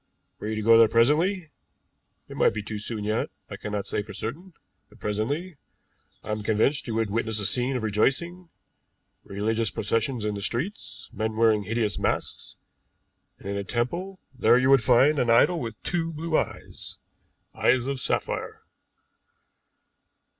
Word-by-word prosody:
Were - - -5
you 110 - -2
to 110 - -3
go 115 +1 +7
there 115 - +7
presently 155 - +2 0.8
it - - -10
might - - +3
be 105 - -3
too 105 0 -5
soon 105 0 -5
yet, 110 +1 -1 0.2
I - - -4
cannot 105 -2 -4
say - - -2
for 105 -1 -10
certain 165 - -6 0.4
but - - -20
presently, 140 - -2 0.7
I - - -5
am 105 0 -2
convinced 110 +8 +1
you 115 - -3
would 110 -2 0
witness 110 0 -1
a 100 - -1
scene 125 +5 0
of 120 - -5
rejoicing, 165 - 0 0.7
religious 110 +2 -1
processions 115 +3 -1
in 105 - -1
the 100 - -5
streets, 135 - -4
men 110 +1 -2
wearing 110 -2 +3
hideous 110 -1 -1
masks; - - -2 0.8
and - - -11
in 100 - -2
a 100 - -2
temple 170 - -3
there 120 -2 +4
you 130 +1 +3
would 135 -3 +6
find 130 +6 +4
an 120 - +1
idol 165 +9 +5
with 115 -6 -6
two 165 -2 -1
blue 160 +1 -3
eyes - - -3 0.6
eyes 125 -1 +2
of 135 -1 -2
sapphire." - - -3
115 Hz, 160 wpm, -26 LUFS, 110-140 Hz, 0.8 s, go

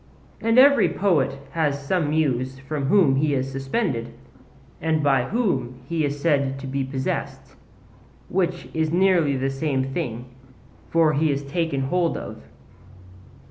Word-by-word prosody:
And 225 +1 +2
every 280 +2 +6
poet 150 -9 +1
has 145 -4 -1
some 165 -1 0
Muse 130 -4 0
from 140 +1 -4
whom 150 -6 +4
he 145 0 +1
is 135 0 -2
suspended, 135 - -2 0.7
and 155 -1 0
by 135 -4 +3
whom 135 - -1
he 165 0 -1
is 145 0 -2
said 140 -4 +1
to 135 - -8
be 135 +1 -2
possessed, 130 0 -4 0.7
which 175 -1 -1
is 160 -1 0
nearly 175 -6 +3
the 135 +1 -1
same 135 -1 -1
thing; 125 -8 -4 0.6
for 165 -2 +3
he 155 +2 +2
is 140 0 -2
taken 145 -1 -2
hold 170 +5 0
of. - - -8
145 Hz, 140 wpm, -23 LUFS, 135-170 Hz, 0.7 s, every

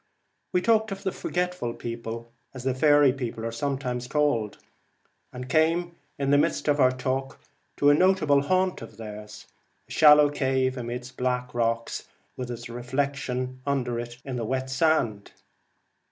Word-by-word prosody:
We 180 - +1
talked 220 -2 +3
of 195 0 -6
the 190 - 0
Forgetful 180 -12 -2
People 115 0 -6 0.2
as 130 - -7
the 130 0 +1
faery 145 0 +5
people 120 -4 -5
are 115 - -2
sometimes 125 0 -3
called, 140 -7 0 0.7
and 125 0 -7
came 165 +4 +2 0.2
in 140 -1 0
the 145 - +5
midst 155 +1 0
of 145 0 +2
our 130 -2 +5
talk 130 +1 -3 0.4
to 145 0 +5
a - - +6
notable 155 -4 +4
haunt 185 +5 +1
of 115 - -10
theirs, 105 -1 -9 0.4
a - - -16
shallow 150 -1 +7
cave 130 -2 0
amidst 125 +1 -6
black 125 0 -1
rocks, 115 -1 -1 0.3
with 125 -1 -5
its 120 -1 -6
reflection 130 +1 -3
under 125 -4 -1
it 120 0 -7
in 130 -2 -4
the 115 - -2
wet 130 +3 -2
sea 130 - -3
sand. 120 -10 +1
130 Hz, 160 wpm, -26 LUFS, 120-145 Hz, 0.7 s, shallow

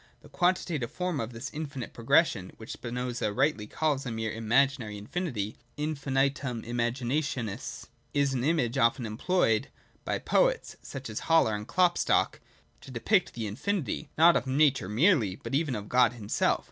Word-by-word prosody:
The - - -16
quantitative 175 -8 0
form 180 -2 -2
of 115 +1 -3
this 115 -1 -7
infinite 145 -5 -5
progression, 115 - +2
which 110 - -9
Spinoza 120 -2 -3
rightly 130 -2 +1
calls 150 -1 0
a 125 - -4
mere 110 -1 -2
imaginary 115 0 +1
infinity 110 - -3 0.2
[infinitum 140 -4 -1
imaginationis), 120 0 -2 0.3
is 140 -2 +1
an 125 -2 -1
image 135 -5 +1
often 115 +1 +2
employed 115 0 +1 0.4
by - - -1
poets, - - +1
such 135 0 -7
as 110 -1 -4
Haller 160 -9 +5
and 105 +1 -4
Klopstock, 180 -1 +2 0.4
to - - -12
depict 155 - +1
the 115 -2 -3
infinity, 150 - -2
not 170 +2 +7
of - - 0
Nature 135 -6 +2
merely, 115 - +3
but 110 - -8
even 145 -2 +1
of 105 -1 -6
God 125 -1 +4
himself. 105 -4 0
130 Hz, 150 wpm, -29 LUFS, 115-150 Hz, 0.4 s, not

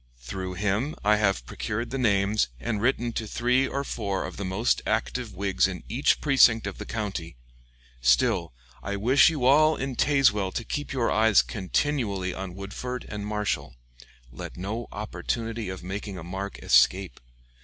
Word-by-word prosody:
Through 90 +10 -6
him 105 - -1
I 105 +1 +4
have 95 - +1
procured 105 - -4
the 135 - -2
names 105 -2 +2
and 105 - -2
written 120 -1 +1
to 110 - -3
three 125 +4 +2
or 140 +1 -2
four 100 -7 -3
of - - -7
the 100 - -4
most 95 +5 +1
active - - -2
Whigs 95 -1 +1
in 90 -2 -6
each 125 +6 +2
precinct 125 -6 +5
of 100 - -5
the - - -7
county. 95 - -4 0.6
Still, 60 0 +3 0.3
I 100 +9 -3
wish 125 +10 +5
you 150 -6 -2
all 155 +4 +5
in 135 -2 -4
Tazewell 130 -9 +3
to 115 - -1
keep 145 +6 -4
your 125 -4 0
eyes 110 - +5
continually 95 - -1
on 95 -1 -6
Woodford 120 +6 -5
and 105 -1 -5
Marshall. 105 - -2 0.6
Let - - -8
no 105 +6 -4
opportunity 115 +1 -4
of 95 -1 -7
making 95 +1 -5
a 85 - -7
mark 95 +3 -5
escape. 90 +5 +3
105 Hz, 165 wpm, -26 LUFS, 95-120 Hz, 0.6 s, precinct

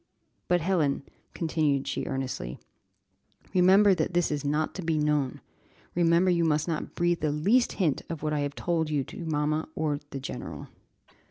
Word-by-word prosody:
But, 175 -1 +3
Helen," 155 -6 +1 0.3
continued 155 -4 0
she 140 - -2
earnestly, 130 - -3 1.0
"remember 190 +2 +6
that 180 -1 -1
this 175 -3 +2
is 145 -1 -2
not 150 +2 0
to 190 - -5
be 165 -2 0
known; 150 -3 0 0.5
remember 175 +1 +3
you 170 -1 +2
must 155 -1 +1
not 165 -2 -3
breathe 175 0 +1
the 150 -1 0
least 205 +12 +2
hint 165 -8 0
of 165 -3 -5
what 155 0 0
I 150 - 0
have 145 0 -2
told 165 -3 0
you 145 -3 0
to 170 - -8
mamma 155 0 0
or 150 -2 -1
the 140 - -5
general." 135 - -7
155 Hz, 170 wpm, -28 LUFS, 145-175 Hz, 1.0 s, remember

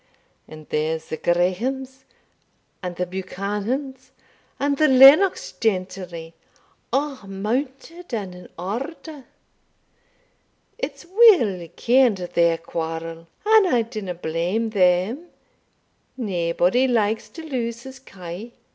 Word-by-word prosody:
And 155 -1 -12
there's 160 +1 -2
the - - -2
Grahames, 250 +11 -1 0.8
and 180 -2 -5
the 180 - -2
Buchanans, 205 +8 -4 0.5
and 280 0 0
the 310 - +4
Lennox 275 +8 +7
gentry, 185 -5 -3 0.6
a' 275 +1 -1
mounted 265 - -4
and 200 -6 -4
in 180 0 -13
order 270 - -6 1.5
It's 280 - -5
weel 345 - +4
ken'd 245 -3 +3
their 170 -2 +1
quarrel; 165 0 -5 0.2
and 435 -2 +6
I 245 -9 +2
dinna 215 -6 -6
blame 175 +7 -2
them 195 - +2 0.9
naebody 185 +2 +1
likes 220 -3 0
to 325 - -10
lose 240 -6 -4
his 265 0 -10
kye. 195 -1 -9
215 Hz, 100 wpm, -23 LUFS, 180-265 Hz, 1.5 s, Lennox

